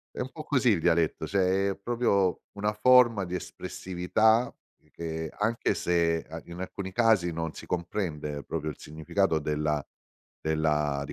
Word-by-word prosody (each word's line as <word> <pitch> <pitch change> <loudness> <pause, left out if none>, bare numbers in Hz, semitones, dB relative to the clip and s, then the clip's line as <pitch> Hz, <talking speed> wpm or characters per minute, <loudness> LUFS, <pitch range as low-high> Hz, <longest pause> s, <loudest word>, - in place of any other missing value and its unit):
È - - -8
un 130 +1 -3
po' 155 - -7
così 130 -5 +2
il 90 -6 +2
dialetto, 80 -1 +2
cioè 95 0 +1
è - - -4
proprio 100 -4 +1 0.2
una 105 +1 0
forma 120 -2 +5
di 90 +1 -3
espressività 110 +8 0 0.4
che 80 -1 -5
anche 110 +3 +1
se 85 -2 +1
an 80 +1 -7
in 85 +1 -9
alcuni 95 +1 -5
casi 110 -6 +3
non 80 -1 -3
si - - -10
comprende 80 -5 -3
proprio 80 +1 -3
il - - -8
significato 80 +3 0
della 75 0 -1 0.6
della 75 -2 0
di - - -7
90 Hz, 155 wpm, -28 LUFS, 80-105 Hz, 0.6 s, forma